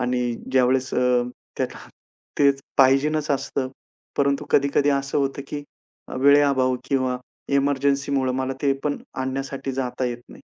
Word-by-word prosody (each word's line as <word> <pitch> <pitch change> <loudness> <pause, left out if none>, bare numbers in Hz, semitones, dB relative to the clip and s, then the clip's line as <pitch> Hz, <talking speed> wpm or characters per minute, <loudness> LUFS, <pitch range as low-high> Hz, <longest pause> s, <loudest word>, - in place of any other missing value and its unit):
आणि 125 -1 0 0.2
ज्यावेळेस 130 0 +2
अ, 125 -1 +3 0.3
त्यात - - 0 0.7
तेच 140 -1 +4 0.2
पाहिजेनच 145 +3 +3
असतं. 135 -1 -1 0.5
परंतु 140 +1 +1
कधी-कधी 140 +1 +3
असं 140 0 0
होतं 140 0 -1
की 145 - -4 0.6
वेळे 140 +1 +7
अभाव 130 -2 +2
किंवा 130 -2 0 0.4
एमर्जन्सीमुळं 140 -1 +1
मला 130 0 -1
ते 140 -1 +3
पण 145 -1 0 0.2
आणण्यासाठी 135 +1 -3
जाता 130 -1 -2
येत 120 -1 -2
नाही. - - -13
135 Hz, 130 wpm, -23 LUFS, 130-140 Hz, 0.7 s, वेळे